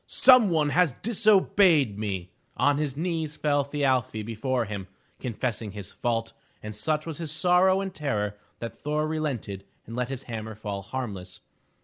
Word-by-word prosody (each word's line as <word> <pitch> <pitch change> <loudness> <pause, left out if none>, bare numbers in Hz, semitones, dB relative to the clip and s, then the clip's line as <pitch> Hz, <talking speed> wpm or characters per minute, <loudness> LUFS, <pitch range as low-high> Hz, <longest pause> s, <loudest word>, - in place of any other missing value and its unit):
"Some 255 -6 +6
one 155 -3 +2
has 170 -2 +3
disobeyed 195 - +4
me!'' 95 -4 -3 0.3
On 145 0 +3
his 145 -3 -2
knees 160 -2 -2
fell 145 -1 +2
Thi 145 +1 -5
arfi 125 -5 +1
before 120 +2 -1
him 100 -3 -5 0.3
confessing 115 -4 -3
his 100 -1 -7
fault, 115 -1 -2 0.3
and 105 0 -6
such 150 +8 -1
was 165 -2 -5
his 160 -3 -4
sorrow 180 +4 +4
and 195 -1 -4
terror 105 - -2 0.2
that 115 -1 -6
Thor 150 +1 -1
relented 140 -11 -3 0.2
and 115 - -8
let 125 0 -1
his 135 -1 -5
hammer 110 -2 -6
fall 105 -2 -5
harmless. 100 -4 -6
130 Hz, 160 wpm, -27 LUFS, 110-155 Hz, 0.3 s, Some